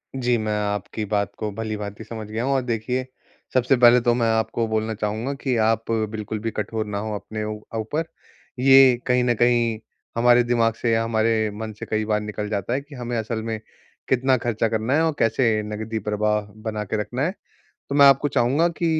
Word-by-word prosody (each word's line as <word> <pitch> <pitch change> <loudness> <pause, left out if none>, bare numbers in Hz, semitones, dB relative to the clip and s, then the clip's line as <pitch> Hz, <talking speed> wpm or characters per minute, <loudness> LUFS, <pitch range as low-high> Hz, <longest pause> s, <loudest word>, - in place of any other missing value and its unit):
जी 125 -2 +1
मैं 110 -1 -2
आपकी 105 +1 -3
बात 100 0 -1
को 110 -1 -3
भलीभाँति 105 -1 -5
समझ 110 0 -7
गया 110 +2 -3
हूँ 135 +2 +1
और 135 - +2
देखिए 125 +2 -2 0.5
सबसे 130 +1 +3
पहले 120 0 +7
तो 120 0 +3
मैं 120 -1 +1
आपको 115 +1 -1
बोलना 110 0 -1
चाहूँगा 110 +5 -2
कि, 135 -2 -2
आप 115 +1 +1
बिल्कुल 110 -1 -2
भी 115 +1 -3
कठोर 110 +1 -3
ना 105 -1 -4
हों 110 +1 -4
अपने 110 +1 -5
ऊ 105 0 -4 0.2
ऊपर। 145 +9 -2 0.6
ये 135 -1 +7
कहीं 125 0 +3
न 120 -1 +2
कहीं 120 -1 +2 0.4
हमारे 120 +1 +5
दिमाग 115 -1 +2
से 115 +1 -1
या 115 0 +2
हमारे 110 -1 +1
मन 110 0 -5
से - - -5
कई 110 0 -1
बार 105 0 0
निकल 105 0 -5
जाता 105 +2 -2
है 135 - 0
कि, 145 +1 -13
हमें 120 -1 -3
असल 110 0 -3
में 110 -1 -3 0.5
कितना 130 0 +3
खर्चा 115 -1 0
करना 110 +3 -1
है 160 - +3
और 160 -2 0
कैसे 115 -1 +2
नकदी 110 +1 -4
प्रवाह 105 +1 0 0.2
बना 110 -1 -3
के 105 +2 -3
रखना 120 +5 -4
है? 175 - 0 0.6
तो 140 - -3
मैं 140 -1 +7
आपको 140 +1 +5
चाहूँगा 140 +5 +2
कि, 170 0 -3
115 Hz, 205 wpm, -23 LUFS, 110-125 Hz, 0.6 s, पहले